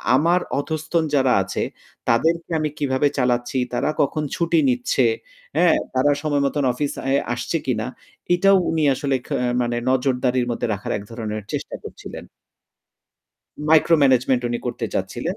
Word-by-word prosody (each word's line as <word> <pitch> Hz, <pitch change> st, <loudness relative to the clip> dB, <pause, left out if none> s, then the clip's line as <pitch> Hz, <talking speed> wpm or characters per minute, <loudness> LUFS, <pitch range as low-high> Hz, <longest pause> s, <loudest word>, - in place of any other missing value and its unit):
আমার 170 Hz, +6 st, +3 dB, 0.2 s
অধস্তন 160 Hz, +2 st, -1 dB
যারা 130 Hz, -2 st, +3 dB
আছে 95 Hz, -, -4 dB, 0.5 s
তাদেরকে 165 Hz, +9 st, +2 dB
আমি 155 Hz, 0 st, 0 dB
কিভাবে 135 Hz, 0 st, +1 dB
চালাচ্ছি, 125 Hz, 0 st, 0 dB, 0.2 s
তারা 125 Hz, -, 0 dB
কখন 150 Hz, +2 st, 0 dB
ছুটি 170 Hz, -, +2 dB
নিচ্ছে, 250 Hz, -1 st, +1 dB, 0.5 s
হ্যাঁ? 175 Hz, -2 st, +5 dB, 0.2 s
তারা 130 Hz, +3 st, +3 dB
সময় 145 Hz, -2 st, 0 dB
মতন 140 Hz, +1 st, 0 dB
অফিস 140 Hz, +3 st, -2 dB
অ্যা 135 Hz, +1 st, +2 dB, 0.2 s
আসছে 120 Hz, +7 st, -2 dB
কিনা 110 Hz, -4 st, 0 dB, 0.5 s
এটাও 195 Hz, +2 st, +5 dB
উনি 160 Hz, -1 st, 0 dB
আসলে 135 Hz, +1 st, -1 dB
খে -, -, -3 dB, 0.3 s
মানে 120 Hz, 0 st, -1 dB
নজরদারির 130 Hz, -1 st, +1 dB
মধ্যে 120 Hz, 0 st, -2 dB
রাখার 100 Hz, -, -5 dB
এক 100 Hz, -, -8 dB
ধরনের 110 Hz, -2 st, -4 dB
চেষ্টা -, -, -4 dB
করছিলেন। -, -, -9 dB, 1.5 s
মাইক্রো 160 Hz, +1 st, +5 dB
ম্যানেজমেন্ট 130 Hz, -1 st, +3 dB
উনি 120 Hz, 0 st, -2 dB
করতে -, -, -3 dB
চাচ্ছিলেন। -, -, -3 dB
135 Hz, 145 wpm, -22 LUFS, 125-160 Hz, 1.5 s, হ্যাঁ